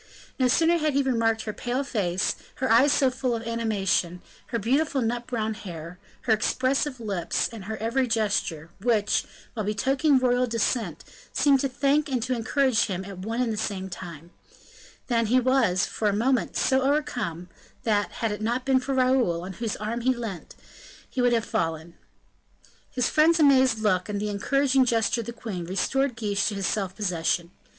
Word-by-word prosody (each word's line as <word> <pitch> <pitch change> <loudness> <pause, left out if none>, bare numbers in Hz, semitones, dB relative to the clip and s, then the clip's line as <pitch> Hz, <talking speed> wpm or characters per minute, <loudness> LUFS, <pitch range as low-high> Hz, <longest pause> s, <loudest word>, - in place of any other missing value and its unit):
No 255 - +4
sooner 330 +7 +3
had 305 -2 0
he 280 - +3
remarked 225 -4 +1
her 215 - -4
pale 250 +5 -2
face, 190 -8 -1 0.2
her 260 -2 -1
eyes 255 +6 +6
so 270 -3 +3
full 255 -1 -1
of 225 - -5
animation, 205 -6 -1 0.2
her 235 - -2
beautiful 270 +6 +1
nut 240 +1 -2
brown 220 -3 -2
hair, 175 -4 -9 0.2
her 230 - +2
expressive 260 +4 0
lips, 200 -7 -1
and 225 -5 -9
her 220 +1 -4
every 240 +4 0
gesture, 200 -8 -1
which, 215 -1 +1 0.3
while 215 - -3
betokening 265 +7 +2
royal 250 0 +2
descent, 230 +1 -1 0.3
seemed 280 -2 +3
to 275 - 0
thank 280 +3 +1
and 250 -4 -1
to 255 +1 -1
encourage 250 +1 +2
him 190 -3 -4
at 195 -2 -9
one 225 +6 -2
and 230 -2 -1
the - - -5
same 190 -3 -3
time, 170 -2 -9 0.7
than 230 -3 +1
he 250 +4 +4
was, 245 -8 +2
for 215 - -1
a - - 0
moment, 245 +4 +1
so 265 0 +2
overcome, 250 - -1 0.4
that, 210 -2 +1
had 225 -2 -2
it 210 - -5
not 240 +3 -1
been 265 -1 +3
for 270 +1 -3
Raoul, 255 -10 +2
on 190 +1 -6
whose 225 +2 -3
arm 220 +3 -3
he 260 +2 +2
leant, 225 -8 -7 0.6
he 255 - -1
would 245 0 +3
have 230 -2 +1
fallen. 165 0 -2 1.0
His 250 -2 0
friend's 320 +2 +4
amazed 265 -5 +5
look, 210 -3 0
and 205 -1 -2
the 210 +1 -2
encouraging 270 +6 +2
gesture 230 -1 +1
of 225 - -10
the - - -3
queen, 220 -6 -6
restored 245 +9 0
Guiche 205 -3 0
to 210 - -2
his 195 -1 -2
self 190 -1 -1
possession. 170 -3 -1
230 Hz, 185 wpm, -26 LUFS, 200-260 Hz, 1.0 s, eyes